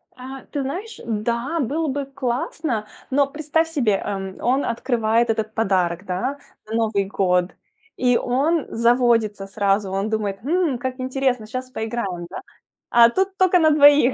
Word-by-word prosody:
А, 260 +1 -9
ты 285 - -2
знаешь, 365 +12 -5
да, 235 +8 -1
было 305 +6 -1
бы 285 0 -2
классно, 260 -2 -2 0.3
но 280 +1 +3
представь 310 +3 -1
себе, 260 -10 +1
эм, 195 -2 -4
он 260 +3 +1
открывает 235 -1 +1
этот 220 -1 -1
подарок, 185 -4 0
да, 240 +10 -2 0.3
на 220 - -3
Новый 215 -3 +1
год. 180 -2 +1 0.5
И 245 -1 +3
он 285 +6 +1
заводится 230 -4 +2
сразу, 200 -1 0
он 195 +2 -1
думает: 210 -3 -2
хм, 320 -2 +1
как 260 +1 -4
интересно, 255 -3 -1
щас 255 +2 -5
поиграем, 220 -7 -3
да. - - -7 0.5
А 235 0 +7
тут 380 +7 -1
только 370 -1 +4
на 315 -1 +5
двоих. 290 -3 +6
240 Hz, 155 wpm, -22 LUFS, 215-280 Hz, 0.5 s, А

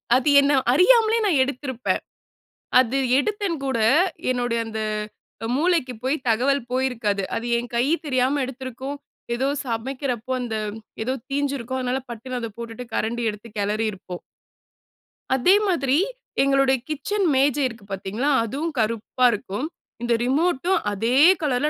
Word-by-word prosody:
அது 260 +3 +2
என்ன 280 +1 +2 0.2
அறியாமலே 450 - +5
நான் 300 -9 +3
எடுத்திருப்பேன். 260 -2 -2 0.8
அது 260 +1 +2 0.2
எடுத்தேன் 400 +2 -1
கூட, 265 -4 0 0.5
என்னுடைய 245 -2 0
அந்த 220 0 -5 0.8
மூளைக்கு 320 -5 +1
போய் 265 +3 +1
தகவல் 260 +5 +2
போயிருக்காது. 240 -6 0
அது 235 - -3
என் 240 0 -4
கையி 255 +6 +2
தெரியாம 265 0 +1
எடுத்திருக்கும். 260 +1 -6 0.4
எதோ 260 +3 0 0.2
சமைக்கிறப்போ 250 +1 -3
அந்த 235 -3 -3 0.5
எதோ 255 +3 -1 0.2
தீஞ்சிருக்கும், 275 -3 -2
அதனால 255 +1 -1
பட்டுன்னு 250 +2 -5
அத 230 -1 -4
போட்டுட்டு 235 +1 -7
கரண்டி 235 +2 -1
எடுத்து 210 +2 -11
கெளறியிருப்போம். 205 -3 -2 1.1
அதே 355 +10 +5
மாதிரி, 280 -6 +2 0.5
எங்களுடைய 275 -1 +3
கிச்சன் 375 +7 -1
மேஜை 280 +1 +3
இருக்கு 230 -4 -11
பாத்தீங்களா? 200 +8 -2
அதுவும் 280 +9 -3
கருப்பா 230 +3 0
இருக்கும். 210 +3 -3 0.4
இந்த 240 0 +1
ரிமோட்டும் 330 +6 +1
அதே 225 +5 0 0.2
கலர்ல 290 -1 +1
255 Hz, 125 wpm, -23 LUFS, 230-280 Hz, 1.1 s, அறியாமலே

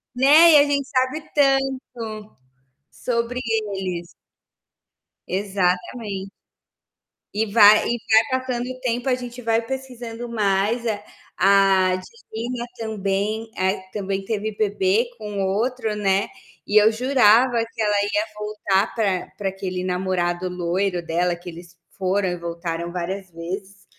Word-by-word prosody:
Né. 305 +6 +7
E - - +9
a 285 - +7
gente 280 -1 0
sabe 260 +3 0
tanto 260 -6 0 0.6
sobre 245 +1 -2
eles. 195 -6 -2 1.2
Exatamente. 195 +1 -2 1.0
E 220 +2 +1
vai 210 -1 +7
e 240 - 0 0.3
vai 260 - +2
passando 250 -2 -3
o 255 0 -7
tempo, 245 +1 -1
a 250 - +3
gente 245 0 -8
vai 225 0 +1
pesquisando 240 -2 -6
mais. 210 +2 0
A 205 -2 -2 0.3
a 190 -1 +4
Divina 240 - -6
também, 215 +1 -2
é 185 - +1
a 190 - -5
que 185 0 -21
também 195 -1 -3
teve 215 0 -3
bebê 205 +1 +1
com 210 -2 -4
outro, 220 +3 -1
né. 195 -1 +1 0.4
E 210 +1 +5
eu 215 - +6
jurava 245 -1 +4 0.2
que 225 - -4
ela 205 -1 +2
ia 205 +1 0
voltar 210 0 0
pra 195 -5 0
pra 195 -2 -1
aquele 185 -1 -4
namorado 180 -1 -1
loiro 180 0 -1
dela, 175 +1 0
que 175 +1 -10
eles 170 +1 -12 0.2
foram 190 0 0
e 175 - -3
voltaram 170 0 -4
várias 185 +2 -4
vezes. 190 +4 -7
205 Hz, 135 wpm, -22 LUFS, 190-235 Hz, 1.2 s, E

